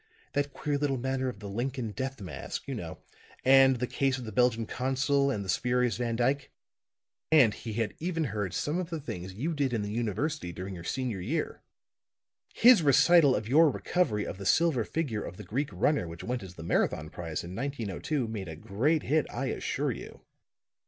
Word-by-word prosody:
That 145 0 0
queer 145 +1 -2
little 140 -2 0
matter 130 +1 -1
of 105 -5 -9
the 105 - -6
Lincoln 120 +2 -3
death 130 +2 -4
mask, 95 - -6
you - - -3
know, - - -6 0.5
and 135 0 +7
the 125 +1 -1
case 135 +1 0
of 125 - -7
the 110 - -6
Belgian 115 0 +2
Consul 135 +3 +1
and 105 -7 -2
the - - -8
spurious 125 +1 +1
Van 120 -1 -1
Dyke. 135 +4 0 0.8
And 135 -9 +6
he 110 +1 -7
had 115 0 -1
even 165 -1 -1
heard 105 - -3
some 150 - -1
of 180 -2 -3
the 165 -2 -3
things 95 -9 -6
you 155 +10 -2
did 140 -4 0
in 110 -3 0
the 105 - -4
university 115 - -2
during 95 +3 -6
your 85 -2 -8
senior 120 -2 -2
year. 145 - -2 0.9
His 245 -5 +7
recital 150 0 +6
of 105 +1 -3
your 155 +6 +6
recovery 135 - 0
of 95 - -6
the 100 - -6
silver 160 - +3
figure 125 -6 -2
of - - -8
the 105 - -8
Greek 135 +10 -2
runner 145 - +1
which 85 0 -8
went 125 0 -2
as 95 -2 -10
the 80 - -9
Marathon 80 -2 0
prize 80 -3 -4
in 90 +2 -7
1902 130 - -2
made 105 -4 -5
a 80 - -6
great 115 - 0
hit, 155 +2 +1
I - - -3
assure - - -1
you. - - -9
125 Hz, 200 wpm, -29 LUFS, 105-145 Hz, 0.9 s, and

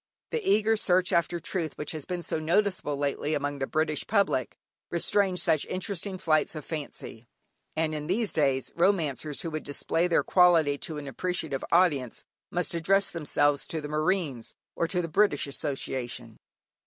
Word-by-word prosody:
The 465 - -1
eager 215 - +3
search 185 -2 +3
after 170 0 +1
truth 170 -1 -3
which 150 - -4
has 155 -3 -5
been 180 -1 -4
so 160 - -1
noticeable 180 -2 +1
lately 145 +2 -1
among 145 0 -2
the 135 - -1
British 155 -1 -1
public, 200 - +1 0.3
restrains 180 +1 +2
such 155 -3 +3
interesting 190 +1 -3
flights 155 -2 +1
of 155 - -6
fancy, 140 -6 -7 0.5
and 160 0 0
in 150 -1 -4
these 210 +4 0
days, 135 -4 +1
romancers 160 -5 +1
who 165 - -4
would 155 0 -3
display 165 +4 0
their 170 - +2
quality 165 -6 +4
to 155 - -4
an 145 -1 -6
appreciative 160 -2 -2
audience, 150 -9 +2 0.2
must 175 0 0
address 195 +4 +2
themselves 145 -3 +1
to 160 - -2
the 150 - -5
Marines, 155 -5 -1 0.2
or 170 - 0
to 180 0 -1
the - - -2
British 165 -2 +2
Association. 130 -5 -4
160 Hz, 165 wpm, -28 LUFS, 145-180 Hz, 0.5 s, quality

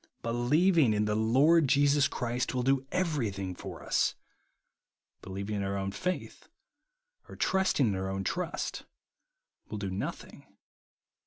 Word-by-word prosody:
Believing 130 - +3
in 105 0 +1
the 105 - 0
Lord 135 +9 +4
Jesus 145 +1 +4
Christ 125 +1 -2
will 125 - 0
do 135 +1 +1
everything 110 - -1
for - - -9
us; - - +1 1.1
be - - -11
lieving 100 +2 -4
in 100 - -1
our 100 0 -2
own 95 0 -2
faith, 180 - -4 0.8
or - - -9
trusting 190 -7 +2
in 105 - +1
our 95 0 -3
own 95 0 -3
trust, 175 - -3 0.9
will 105 - -4
do 100 -2 -4
nothing. 95 - -7
120 Hz, 140 wpm, -30 LUFS, 100-145 Hz, 1.1 s, Lord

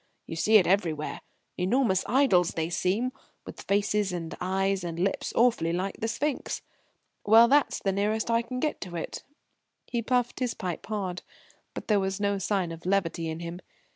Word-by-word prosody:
You - - -6
see 215 +6 +5
it 190 - +4
everywhere 170 -5 0 0.4
enormous 190 +1 +2
idols 215 -10 +3
they 160 +1 -2
seem, 205 +9 0 0.3
with - - -9
faces 205 0 +1
and 170 -2 -5
eyes 195 +1 0
and 170 -1 -4
lips 195 +2 -1
awfully 225 -9 +3
like 185 +3 -2
the 225 - -1
sphinx 265 +5 -2 0.6
well, 225 +3 +7
that's 285 +3 +3
the 195 - 0
nearest 210 +3 0
I 230 0 +3
can 250 +2 -5
get 300 +3 -2
to 180 -2 -6
it." 165 - -5 0.6
He 235 - -2
puffed 245 +2 0
his 250 -2 -1
pipe 180 -3 -5
hard. 190 -4 -3 0.5
But - - -6
there 210 -2 +3
was 190 0 -2
no 200 -1 0
sign 190 -2 0
of 165 +2 -8
levity 170 -4 0
in 160 +1 -5
him. 170 +1 -6
195 Hz, 175 wpm, -28 LUFS, 175-225 Hz, 0.6 s, well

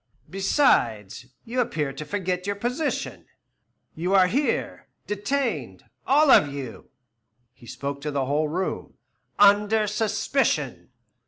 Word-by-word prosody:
Besides, 125 - +1 0.2
you 250 +2 -1
appear 150 - -2
to 150 +3 -7
forget 185 0 -3
your 200 - -1
position. 250 +8 -3 0.7
You 180 +4 -1
are 190 -1 +6
here, 270 +11 -1 0.2
detained 235 +6 -2 0.2
all 290 +1 +5
of 145 - +6
you" 135 -4 -8 0.6
he 120 - -17
spoke 140 +3 -5
to 150 - -3
the 140 -2 -1
whole 150 +3 0
room 180 +5 -4 0.4
"under 205 +2 +4
suspicion. 215 +5 -1
195 Hz, 115 wpm, -24 LUFS, 145-220 Hz, 0.7 s, are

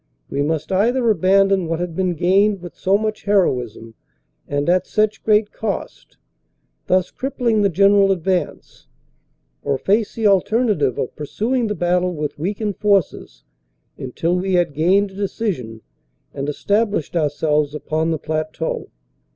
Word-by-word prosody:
We 140 - -1
must 155 +3 -2
either 235 +6 +2
abandon 195 -1 +3
what 165 0 -2
had 175 -2 -4
been 185 -1 0
gained 195 +5 +2
with 175 - -8
so 195 +2 +2
much 215 0 -4
heroism 125 - 0 0.5
and 145 +1 -2
at 180 +1 +2
such 215 0 0
great 210 -1 +2
cost, 220 -2 -5 0.7
thus 185 0 +1
crippling 245 -5 -1
the 200 - +3
general 195 +2 +4
advance, 185 0 -3 0.7
or 140 - -1
face 205 - 0
the 225 - -2
alternative 200 - +2
of 125 - -3
pursuing 225 - -1
the 210 - -2
battle 180 0 0
with 150 -1 -4
weakened 205 +4 -3
forces 195 - 0 0.5
until 165 +7 -2
we 190 +1 -1
had 175 -4 +1
gained 190 +7 +2
a - - -15
decision 185 - -3 0.5
and 140 +1 -4
established 205 +1 -1
ourselves 150 -1 0
upon 155 +1 -1
the 160 - 0
plateau. 155 +1 -3
185 Hz, 140 wpm, -20 LUFS, 155-205 Hz, 0.7 s, general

